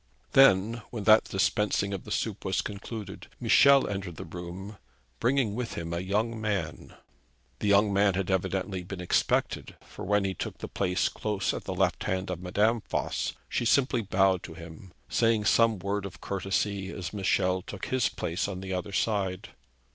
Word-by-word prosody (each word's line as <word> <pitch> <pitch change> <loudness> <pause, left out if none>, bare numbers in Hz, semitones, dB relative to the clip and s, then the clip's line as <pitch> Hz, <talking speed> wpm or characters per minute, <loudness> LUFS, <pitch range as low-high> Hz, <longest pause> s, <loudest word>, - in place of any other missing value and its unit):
Then, 115 -3 +5
when 115 -4 -5
that 110 +1 +6
dispensing 100 0 0
of 95 - -5
the - - -9
soup - - -2
was - - 0
concluded, 100 0 -7
Michel 140 -1 +6
entered 95 -4 -4
the - - -7
room 90 +4 -8 0.4
bringing 125 -4 +2
with 120 +1 -4
him 85 0 -4
a 85 - -1
young 110 +5 -1
man. 95 -8 -3 0.6
The - - -1
young 100 0 +4
man 100 -1 +3
had 95 0 -1
evidently 95 0 -1
been 90 +1 -7
expected; 90 - 0
for, - - -10
when 105 +1 +2
he 95 - -1
took - - -5
the - - -6
place 90 -2 0
close 105 -2 -2
at - - -6
the - - -3
left - - +1
hand 95 0 -1
of 90 -1 -5
Madame 105 +5 +1
Voss, - - -1
she - - -1
simply 125 +1 +3
bowed 95 -2 +2
to 80 - -9
him, 85 +2 -11 0.2
saying 115 -2 +2
some 115 0 +4
word 100 +2 -2
of 95 - -13
courtesy 95 0 -2
as 90 -3 -6
Michel 95 -2 +1
took 95 +1 -7
his 130 -2 +1
place 85 +4 -2
on 95 -2 -5
the 95 0 -4
other 90 +2 -3
side. 95 -4 -1
100 Hz, 175 wpm, -28 LUFS, 95-105 Hz, 0.6 s, that